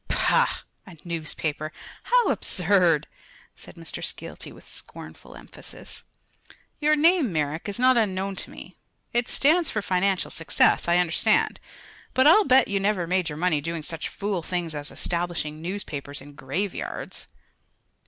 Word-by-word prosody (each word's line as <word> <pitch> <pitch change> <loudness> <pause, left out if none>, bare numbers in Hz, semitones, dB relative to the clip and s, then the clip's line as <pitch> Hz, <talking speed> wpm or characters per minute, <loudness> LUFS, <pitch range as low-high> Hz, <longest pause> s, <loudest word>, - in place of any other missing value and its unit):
"Pah! - - +2 0.2
a 180 -3 -12
newspaper. 155 -2 -3 0.3
How - - +3
absurd," 175 -4 +2 0.5
said - - -14
Mr. - - -6
Skeelty - - -3
with - - -16
scornful - - -10
emphasis. - - -10 0.8
"Your 305 0 +3
name, 315 - +4
Merrick, 155 +3 -2
is 200 - -3
not 255 0 +4
unknown 195 -3 0
to - - -4
me. - - -12 0.4
It 240 0 +1
stands 320 +4 +3
for 215 - -2
financial 190 0 0
success, 165 - +2
I 170 0 +4
understand; 175 -1 +2 0.6
but 260 - +4
I'll 390 +8 +7
bet 260 -1 +5
you 200 0 0
never 195 -3 +1
made 180 0 0
your 150 - -6
money 160 -3 +1
doing 165 +1 -4
such 160 +1 -3
fool 200 -3 -3
things 170 -1 -3
as 145 -1 -4
establishing 170 -3 -2
newspapers 155 -6 -5
in 145 +2 -13
graveyards." 145 +9 -5
180 Hz, 145 wpm, -25 LUFS, 160-210 Hz, 0.8 s, I'll